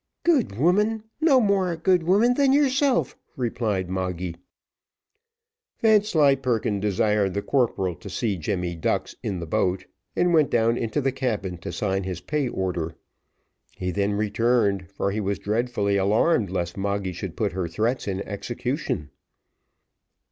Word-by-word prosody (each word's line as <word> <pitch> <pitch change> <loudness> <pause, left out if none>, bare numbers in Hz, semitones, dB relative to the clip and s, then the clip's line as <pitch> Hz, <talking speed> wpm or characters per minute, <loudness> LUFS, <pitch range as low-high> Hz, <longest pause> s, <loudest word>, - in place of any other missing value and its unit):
"Good 275 - +2
woman! 210 - +2 0.2
no 295 -5 +5
more 200 -5 +2
a 165 - -4
good 180 +1 +3
woman 205 +9 +4
than 275 +1 +3
yourself," 270 - +2 0.2
replied 110 -6 -1
Moggy. 90 -2 -3 1.4
Vanslyperken 140 - +3
desired 105 0 +1
the 100 - -1
corporal 110 -9 +1
to - - -11
see 110 -4 -1
Jemmy 90 +1 -2
Ducks 80 - -1
in 100 -3 -3
the 85 - -5
boat, 90 +3 0 0.3
and 175 -1 +2
went 155 -3 +4
down 115 0 +2
into 120 +5 -1
the 135 0 +1
cabin 105 -9 -3
to - - -6
sign 95 -2 -1
his 90 -2 -4
pay 140 +8 -1
order. 85 -6 -3 0.8
He 90 0 -2
then 100 +2 0
returned, 105 -2 +1
for 100 0 -2
he 110 +2 -2
was 100 0 -1
dreadfully 105 -2 0
alarmed 105 - +2
lest 90 -1 -3
Moggy 100 -1 -2
should - - -6
put - - 0
her 90 0 -2
threats 110 +10 -1
in 95 -1 -2
execution. 105 - -4
105 Hz, 145 wpm, -24 LUFS, 95-150 Hz, 1.4 s, no